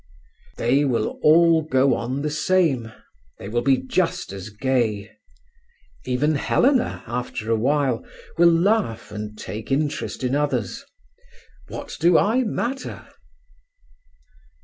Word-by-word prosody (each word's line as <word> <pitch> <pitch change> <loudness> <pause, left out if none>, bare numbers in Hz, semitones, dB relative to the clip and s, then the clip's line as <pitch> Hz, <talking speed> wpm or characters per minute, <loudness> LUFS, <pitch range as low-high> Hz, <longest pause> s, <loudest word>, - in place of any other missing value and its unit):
"They 130 +5 +2
will 120 -6 -1
all 165 +1 +5
go 135 -3 +2
on 130 +4 -3
the 150 - -1
same; 155 -7 +1 0.5
they - - -9
will 120 +3 -1
be 135 +2 +3
just 180 - -1
as 100 +1 -7
gay. 110 -2 -1 0.9
Even 135 +5 +1
Helena, 250 - +1
after 120 -2 -4
a - - +4
while, 130 +1 +1 0.3
will 170 0 +6
laugh 175 - +1
and 105 0 -7
take 110 +4 -7
interest 135 -6 -2
in 125 +1 0
others. 140 -8 -1 0.8
What - - -7
do 170 +1 +5
I 230 +5 +3
matter?" 245 +4 -4
135 Hz, 120 wpm, -23 LUFS, 115-165 Hz, 0.9 s, will